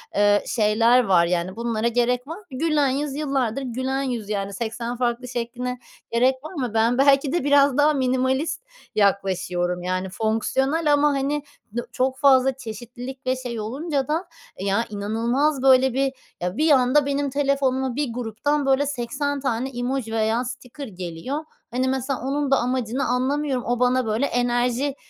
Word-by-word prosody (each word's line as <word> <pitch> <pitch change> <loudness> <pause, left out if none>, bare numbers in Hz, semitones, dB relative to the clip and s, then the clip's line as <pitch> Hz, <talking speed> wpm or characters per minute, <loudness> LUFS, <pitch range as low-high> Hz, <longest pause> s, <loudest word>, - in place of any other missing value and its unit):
eee, 205 0 +4
şeyler 230 +3 +3
var, 185 -5 +4
yani, 175 +1 -1
bunlara 230 0 -1
gerek 245 +2 +1
var 325 +4 -6
mı? 420 - -15
Gülen 295 +1 +1
yüz 275 +1 -2
yıllardır 275 -4 -1
gülen 260 +2 -2
yüz, 235 -6 -3
yani, 200 -1 -2
80 235 +2 -4
farklı 245 0 -1
şekline 245 +1 -4 0.3
gerek 255 +3 +3
var 310 - -8
mı? 255 -8 -3
Ben 230 +3 +2
belki 275 0 +4
de 345 - 0
biraz 285 -1 +4
daha 295 +1 +4
minimalist 265 - 0 0.3
yaklaşıyorum, 180 -3 0
yani, 185 +1 0
fonksiyonel 265 - +1
ama, 290 +1 +4
hani, 280 +2 -1 0.3
dı 240 - -3
çok 260 +1 0
fazla 270 -1 +5
çeşitlilik 245 +3 -8
ve 255 - +2
şey 245 -3 -5
olunca 275 +6 -2
da, 325 +4 -1 0.3
ya, 200 +4 +1
inanılmaz, 235 +8 0
böyle, 265 -1 +5
bir, 270 +1 0 0.3
ya, 180 +4 -2
bir 310 +1 +3
anda 270 +1 +4
benim 280 0 0
telefonuma 265 -2 0
bir 280 -4 -2
gruptan, 250 +5 -1
böyle, 270 +1 +3
80 285 +2 -2
tane 260 -1 -1
emoji 245 -2 -3
veya 225 +2 +1
sticker 255 +2 -7
geliyor. 185 - -5 0.3
Hani, 255 +2 0
mesela, 265 0 -1
onun 275 +2 -1
da 270 - +5
amacını 250 +1 -1
anlamıyorum. 260 +1 0
O 245 0 0
bana, 250 0 +2
böyle, 220 +5 0
enerji 245 +2 0
255 Hz, 160 wpm, -23 LUFS, 230-275 Hz, 0.3 s, fazla